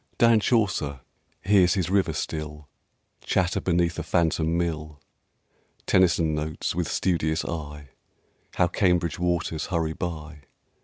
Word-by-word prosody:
Dan 115 -1 +5
Chaucer 95 - 0 0.4
hears 95 -3 +4
his 90 -2 -1
river 100 -1 +2
still 75 -1 -5 0.6
Chatter 90 -1 0
beneath 85 -1 +1
a - - -1
phantom 85 -1 +1
mill. 80 -3 -3 0.9
Tennyson 85 -3 +3
notes, 75 0 -3
with 85 -1 -1
studious 80 -4 0
eye, 75 -3 -6 0.7
How 90 - +4
Cambridge 90 -3 +1
waters 85 -3 -1
hurry 80 -3 -1
by... 80 -3 -6
85 Hz, 115 wpm, -25 LUFS, 80-90 Hz, 0.9 s, Dan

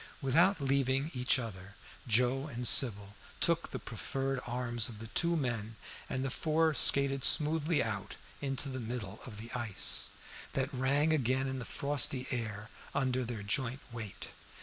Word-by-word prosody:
Without 165 +7 +3
leaving 135 +1 +1
each 125 +2 +2
other 100 -5 -7 0.3
Joe 125 +5 +2
and 120 -4 -1
Sybil 100 -6 +4 0.3
took - - +2
the - - -4
proffered 135 0 -3
arms 120 -2 0
of 110 - -8
the 110 - -8
two 170 +4 +2
men, 115 -6 -2 0.3
and 130 +1 -2
the 135 - -2
four 160 +2 +2
skated 135 0 +3
smoothly 155 +1 +4
out 100 -3 -4 0.3
into 135 0 0
the 130 -1 -4
middle 110 -4 -5
of 110 -4 -9
the 115 +2 -8
ice, 115 -5 0 0.4
that - - -1
rang 140 +4 +2
again 130 -2 +1
in 130 0 -3
the 125 - -6
frosty 140 -2 0
air 110 -4 -3 0.2
under 130 -2 +1
their 115 -3 -5
joint 130 +5 -1
weight. 110 -4 -6
130 Hz, 155 wpm, -32 LUFS, 115-140 Hz, 0.4 s, Sybil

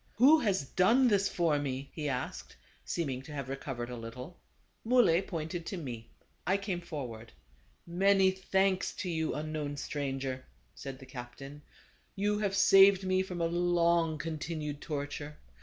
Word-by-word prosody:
" - - -33
Who 285 +7 +7
has 195 - 0
done 235 - +4
this 200 -2 +2
for 165 -4 +1
me? 135 -1 -3
" - - -39
he 150 -2 -3
asked, 130 -1 -4 0.3
seeming 135 -7 -2
to 135 - -12
have 140 -3 -5
recovered 135 -3 -5
a - - -4
little. 125 +8 -8 0.4
Muley 225 -8 +4
pointed 170 -2 -4
to 195 - -4
me. 120 -8 -7 0.4
I 190 +2 +3
came 195 -3 -3
forward. 120 -9 -7 0.4
" - - -35
Many 190 +2 +4
thanks 190 0 0
to 185 - -4
you, 160 -1 -1
unknown 150 -1 -4
stranger," 135 -2 -3 0.3
said 135 -1 -7
the 130 - -12
captain, 135 +3 -9 0.5
"you 205 +1 0
have 200 -2 0
saved 195 -1 +7
me 185 0 +2
from 180 -2 -4
a - - +2
long 170 -1 +2
continued 155 -2 -4
torture. 145 0 -5
160 Hz, 160 wpm, -31 LUFS, 140-190 Hz, 0.5 s, Who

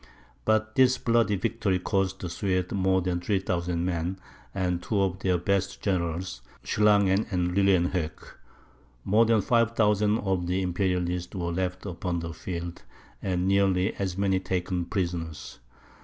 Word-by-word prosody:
But 110 0 +2
this 130 0 +4
bloody 115 -4 +2
victory 110 -2 0
cost 95 +1 -1
the 90 - -4
Swedes 90 -1 -1
more 95 -1 +2
than 90 -1 -1
3000 90 -3 -1
men, 90 +1 -2 0.3
and 90 -2 -1
two 100 +3 -1
of 95 -1 0
their 90 -2 +1
best 100 +2 -1
generals, 85 - -2 0.2
Schlangen 100 -1 +3
and 90 -3 -1
Lilienhoeck. 90 -4 +2 0.9
More 110 +3 +4
than 115 -2 +4
5000 110 -2 +2
of 95 -3 -1
the 95 +2 0
Imperialists 90 -1 -1
were 85 -2 -2
left 90 +1 -3
upon 90 -1 -3
the 85 -1 -4
field, 85 +1 -6 0.4
and 90 -1 -1
nearly 95 0 +2
as 95 -2 -3
many 95 -1 +2
taken 90 -1 -2
prisoners. 85 -4 -4
95 Hz, 140 wpm, -27 LUFS, 90-100 Hz, 0.9 s, this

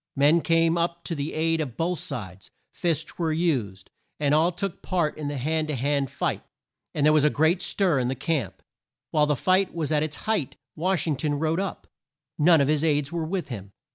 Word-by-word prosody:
Men 150 +4 +4
came 165 +2 +2
up 170 0 -1
to - - -3
the 145 0 -3
aid 165 +1 +1
of 130 -6 -5
both 170 +1 -1
sides. 95 -4 -7 0.2
Fists 165 -1 -2
were 165 -2 +1
used, 130 - -1 0.3
and 145 -1 +2
all 160 +3 +4
took 180 +1 -4
part 170 -4 0
in 150 -1 -5
the 145 0 -3
hand 155 +4 0
to 150 - -2
hand 140 +1 0
fight, - - -2 0.5
and 145 - +2
there 155 - +6
was 155 -2 +4
a 150 - +5
great 160 +5 +2
stir 180 -8 +1
in 125 - 0
the 130 - -1
camp. 140 0 -2 0.5
While 150 -1 +3
the 150 - +2
fight 185 +7 +2
was 160 -3 -2
at 150 -1 +3
its 155 -1 -2
height 215 - -1 0.2
Wash 185 +2 0
ing 155 -4 0
ton 145 +1 -1
rode 160 +3 0
up. 195 -1 -4 0.5
None 165 0 +6
of 140 - +2
his 150 0 +1
aides 145 -2 +1
were 170 -2 -2
with 180 -2 -3
him. 100 -5 -7
155 Hz, 215 wpm, -25 LUFS, 145-170 Hz, 0.5 s, there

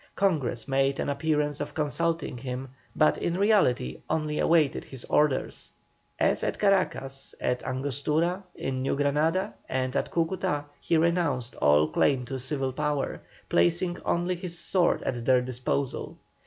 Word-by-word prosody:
Congress 140 - 0
made 135 0 +1
an - - -1
appearance 150 0 0
of - - -5
consulting 160 0 -1
him, 125 +1 -5 0.3
but 155 - +3
in 170 +1 -1
reality 195 - +2
only 155 -1 -1
awaited 160 -4 +3
his 130 -3 -9
orders. 150 -3 0 0.4
As - - +2
at - - -1
Caracas, 135 -9 0
at 125 0 0
Angostura, 145 +7 -1
in 130 -1 -3
New 135 - 0
Granada, 150 +6 +1 0.2
and 130 -1 -1
at - - 0
Cúcuta, 165 -4 0
he 165 - +1
renounced 160 -7 +1
all 75 +1 +4
claim 125 - +2
to 135 +1 -5
civil 135 0 -2
power, 150 0 -2 0.3
placing 175 - +2
only 175 +1 0
his 175 -1 -4
sword 175 0 +2
at 120 -3 -2
their 130 +1 +4
disposal. 130 +2 -2
145 Hz, 140 wpm, -27 LUFS, 130-165 Hz, 0.4 s, all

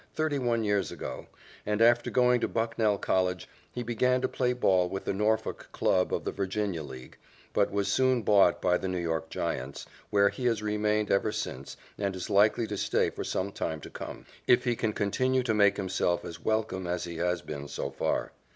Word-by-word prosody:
thirty 155 -2 0
one 120 -3 +1
years 100 -4 0
ago, - - -6 0.4
and, 105 0 -1
after 120 +1 +4
going 125 -1 +3
to - - +1
Bucknell 115 -2 0
College, 90 -2 0 0.2
he 125 - -4
began 125 +2 +1
to - - +1
play 125 -1 0
ball 95 -7 +2
with 95 - -5
the - - 0
Norfolk 105 +3 -1
club 90 -1 +1
of - - -1
the - - -1
Virginia 100 -3 -2
League, 65 -3 -10 0.4
but - - +3
was 100 0 0
soon 130 -2 +2
bought 100 -4 +4
by 90 -1 +3
the - - -3
New 90 -1 -2
York 80 -2 -2
Giants, 65 +3 -4 0.2
where 100 -1 +4
he 125 +3 -2
has 115 -3 0
remained 105 0 0
ever 100 +2 +2
since 65 -8 -5 0.2
and 100 -2 -1
is 90 - -5
likely 105 +3 +4
to 105 -2 -4
stay - - +1
for - - -5
some 95 +2 -2
time 80 -4 -3
to - - -10
come, - - -8 0.2
if 125 - +5
he 120 -2 +1
can 110 -1 -1
continue 130 +6 +1
to 115 -3 0
make 100 -1 +4
himself 95 -2 0
as 85 - -8
welcome 110 -4 -1
as 90 0 -2
he 85 -2 -6
has 90 0 0
been 70 -1 -6
so - - -4
far. - - -1
105 Hz, 205 wpm, -29 LUFS, 90-115 Hz, 0.4 s, if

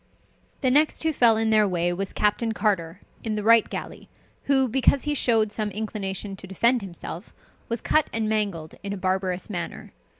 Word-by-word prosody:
The 255 - +2
next 300 +4 +2
who 320 -1 +1
fell 235 -5 +5
in 220 0 +1
their 215 -1 +4
way 175 -1 0
was 195 +2 -3
Captain 220 +2 0
Carter, 190 -5 -1 0.2
in 220 -2 -2
the 210 - -3
Wright 230 0 +5
galley; - - -7 0.4
who, 270 -2 +3
because 265 +2 +2
he 295 - 0
showed 225 -6 +2
some 215 0 -2
inclination 200 -1 -4
to 190 - -10
defend 235 +6 +2
himself, 180 0 -8 0.4
was 230 -1 -3
cut 310 -1 +2
and 225 -1 -1
mangled 200 -8 -1
in 200 0 -4
a - - -5
barbarous 185 -1 -1
manner. 175 -5 -6
215 Hz, 180 wpm, -25 LUFS, 190-230 Hz, 0.4 s, fell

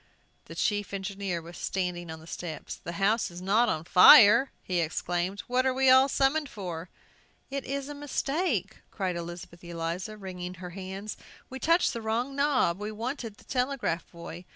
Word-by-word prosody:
The - - -10
chief 205 -2 -1
engineer 195 -3 -4
was 170 +1 -10
standing 180 -2 -3
on 160 0 -7
the 160 - -14
steps. 165 -1 -6
"The 170 - -8
house 200 +5 +1
not 215 +6 +3
on 155 - -1
fire!" 220 - +8
he 180 -2 -1
exclaimed. 175 +4 -2
"What 250 +1 0
are 260 -1 +1
we 265 0 +5
all 260 +1 +6
summoned 280 +2 +1
for?" 180 -5 -6 0.6
"It 275 -1 -3
is 275 0 -3
a 290 - -6
mistake," 285 - -1
cried 185 -4 -2
Elizabeth 170 0 -8
Eliza, 170 +4 -4
wringing 180 -2 -7
her 180 0 -8
hands. 195 +3 -6 0.3
"We 265 - -6
touched 335 +5 +3
the 230 - -4
wrong 235 +5 -1
knob; 275 -11 +2
we 210 +1 -4
wanted 230 0 -5
the - - -18
telegraph 250 -10 -1
boy!" 170 +1 -9
200 Hz, 170 wpm, -28 LUFS, 175-255 Hz, 0.6 s, fire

